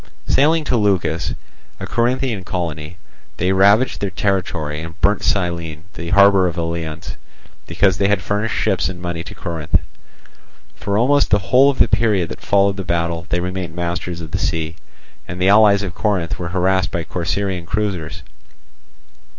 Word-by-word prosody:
Sailing 155 +3 +3
to 130 - 0
Leucas, 95 -7 0 0.4
a - - -5
Corinthian 120 -3 -1
colony, 85 -3 -4 0.4
they 90 +2 +1
ravaged 100 +6 +3
their 100 - -1
territory, 85 -5 -2
and 80 +2 -9
burnt 100 +1 +2
Cyllene, 85 -5 -2
the 85 0 -6
harbour 100 -1 +5
of 85 - -3
the 85 - -2
Eleans, 80 -2 -5 0.5
because 95 -1 +1
they 100 - +3
had 100 -1 +2
furnished 105 +2 -1
ships 95 -4 0
and 90 -2 -7
money 85 -1 -4
to - - -10
Corinth. 80 -2 -4 1.0
For 100 0 -2
almost 140 +5 +3
the 105 - +4 0.2
whole 135 +2 +7
of 140 - -1
the - - +4
period 100 -7 +1
that - - -8
followed 100 0 +2
the 95 - -3
battle 85 -1 -2
they 90 - 0
remained 90 -2 -4
masters 85 0 -3
of 80 -2 -8
the - - -2
sea, 80 0 -2 0.5
and 90 +1 -6
the 95 +1 +3
allies 100 -1 +5
of 95 -3 -4
Corinth 95 -5 -1
were 85 - -3
harassed 95 +1 +1
by 85 -2 -3
Corcyraean 90 +1 -3
cruisers. 90 -5 -3
90 Hz, 165 wpm, -19 LUFS, 85-100 Hz, 1.0 s, whole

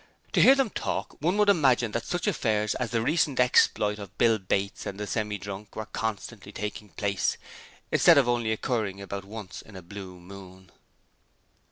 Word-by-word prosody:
To - - +3
hear 265 - +8
them 270 -6 +1
talk, - - -3
one 175 +6 +1
would 210 -1 +4
imagine 130 - +3
that 115 +1 -3
such 175 - -2
affairs 110 - +1
as 125 -2 -3
the 115 -1 0
recent 150 -2 +1
exploit 105 -4 +3
of 100 -2 -10
Bill 115 -2 +4
Bates 95 +1 -2
and 100 - -6
the 105 - -3
Semi 105 -1 -2
drunk 100 +1 -8
were 110 - -4
constantly 105 -1 -5
taking 105 0 -6
place, 100 -1 -1 0.5
instead 170 -3 +6
of 135 -3 +5
only 120 -2 +1
occurring 110 -3 -2
about 100 0 -6
once 105 -2 -8
in 110 - -15
a 95 - -9
blue 95 0 -9
moon. 95 0 -13
105 Hz, 180 wpm, -27 LUFS, 100-120 Hz, 0.5 s, hear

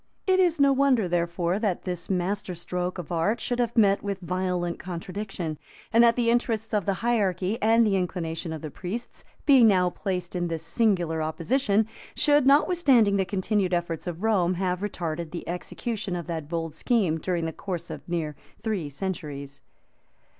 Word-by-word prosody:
It 375 -1 +3
is 345 -4 +3
no 280 -1 +5
wonder, 265 -7 +3
therefore, 175 +1 0
that 205 -5 -1
this 180 -2 -4
master 190 0 -1
stroke 180 +2 -3
of 180 -1 -7
art 175 +7 +1
should 245 +2 -2
have 240 0 0
met 200 -3 +5
with 200 -1 -3
violent 180 -1 -2
contradiction, 180 -2 -5 0.3
and 230 +1 +7
that 235 -1 +5
the 235 -1 +2
interests 225 -2 0
of 205 -4 0
the 200 - +3
hierarchy, 200 -3 +1
and 225 +1 +5
the 205 -2 +2
inclinations 165 -3 -2
of 155 - -9
the 155 - -5
priests, 210 - -6 0.2
being 265 -6 +7
now 180 -3 +3
placed 185 -2 -4
in 175 -1 0
this 165 -1 -3
singular 175 -5 +1
opposition, 205 - +1 0.3
should, 290 -3 +4
notwithstanding 275 - +4
the 190 - +1
continued 190 -1 0
efforts 170 -1 -3
of 175 +2 -5
Rome 185 -5 +2
have 180 0 -1
retarded 170 -5 -3
the 170 +1 -7
execution 195 +3 -4
of 170 -2 -4
that 160 -3 -5
bold 165 -2 -3
scheme 185 - +1
during 175 -1 -1
the 160 - -3
course 175 -4 -5
of - - -6
near 160 -4 -2 0.3
three 200 -9 -2
centuries. 140 -4 -5
185 Hz, 175 wpm, -26 LUFS, 170-220 Hz, 0.3 s, and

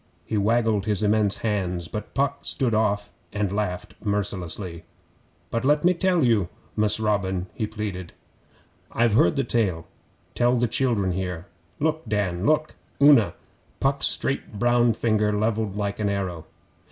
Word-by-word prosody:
He 110 - -3
waggled 110 -1 +2
his 105 -1 0
immense 105 -1 +2
hands, 90 -5 -1
but 105 +3 -7
Puck 140 0 0
stood 125 -4 -1
off 105 -1 0 0.2
and 105 -2 -1
laughed 95 -3 -3
mercilessly. 95 -4 -3 0.7
'But 115 - -1
let 150 +2 +3
me 180 - +5
tell 180 -2 +1
you, 105 -7 +2 0.3
Mus' 105 0 +2
Robin,' 95 -4 0
he 110 - -2
pleaded. 105 -5 -5 0.8
'I've 120 -2 +2
heard 85 -5 +4
the 135 - +1
tale. 95 -11 0 0.5
Tell 120 +1 +2
the 120 0 +2
children 115 -5 +1
here. 90 -2 -4 0.3
Look, 155 +1 0
Dan! 100 -2 0
Look, 155 0 +2 0.3
Una!' 140 -6 +6 0.4
Puck's 140 +1 +1
straight 130 -5 -2
brown 120 +1 +3
finger 110 -1 +1
levelled 105 -1 -1
like 100 0 -2
an 105 -1 0
arrow. 90 -5 -3
105 Hz, 145 wpm, -24 LUFS, 95-120 Hz, 0.8 s, Una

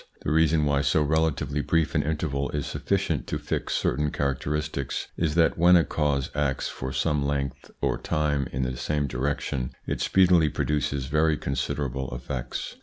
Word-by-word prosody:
The - - -1
reason 80 -1 +3
why 70 -1 +2
so 70 +2 +2
relatively 75 -1 0
brief 80 +1 +1
an - - +3
interval 75 -2 -1
is 75 -2 -1
sufficient - - -1
to - - -2
fix - - -2
certain 75 +1 +1
characteristics 70 0 -2
is 80 -2 0
that 85 -1 +3
when 90 +1 +7
a 85 - +6
cause 70 -2 0
acts 70 -2 0
for 65 0 -5
some 75 +1 0
length 70 -1 -2
or - - 0
time 75 -3 0
in 65 +1 -1
the 65 0 -2
same 75 +2 -1
direction, 65 -1 -2
it - - -2
speedily 90 -4 +4
produces 70 -2 -1
very 75 +2 +2
considerable 65 -2 -2
effects. - - -5
75 Hz, 165 wpm, -26 LUFS, 70-75 Hz, -, when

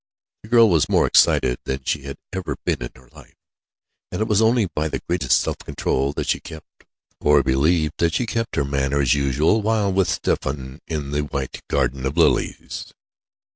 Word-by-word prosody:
The 105 - -14
girl 115 -1 +6
was 85 -7 +2
more - - +3
excited 60 -1 +3
than 65 0 -3
she 75 - -1
had 70 -1 -7 0.2
ever 95 -1 -3
been - - 0
in - - -4
her 65 -1 -19
life, - - -17 0.8
and - - -4
it 110 - 0
was 105 -1 +2
only 115 0 +3
by 80 -3 -2
the - - -5
greatest 75 -8 +2
self - - -3
control 70 +1 -1
that - - -3
she - - +1
kept 80 -1 -13 0.3
or 75 -1 +4
believed 75 +4 +1
that 85 -1 +1
she 125 - 0
kept 115 0 -3
her 70 - +1
manner 70 0 0
as 65 -2 +3
usual, 75 - +2
while 105 -2 +1
with 95 -2 +2
Stephen 65 -3 -2
in 75 -4 -4
the 75 0 0
white 70 -2 -5
garden 65 0 0
of 70 +5 -5
lilies. 85 - 0
75 Hz, 190 wpm, -22 LUFS, 70-95 Hz, 0.8 s, girl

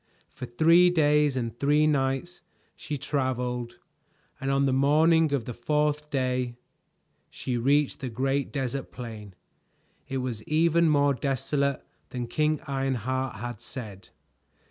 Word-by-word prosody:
For 125 - -7
three 165 +8 +5
days 150 -4 +3
and 115 -2 -3
three 150 +2 +3
nights 140 +4 0 0.3
she 150 -1 -5
traveled, 125 -4 -2 0.6
and 135 - -3
on 135 0 +2
the 135 - +1
morning 155 +4 +4
of 135 -6 -1
the 125 - -5
fourth 150 +4 0
day 125 -3 -1 0.7
she 125 - -4
reached 140 +4 +2
the 130 - -4
great 135 +4 -1
desert 135 -1 -3
plain. 110 -6 -9 0.7
It 135 - -2
was 125 -4 -3
even 165 +1 +3
more 145 -1 +3
desolate 140 +1 -1 0.2
than 125 -1 -4
King 155 +4 0
Ironheart 130 -2 -2
had 120 +1 -6
said. 105 -7 -8
135 Hz, 130 wpm, -27 LUFS, 125-150 Hz, 0.7 s, three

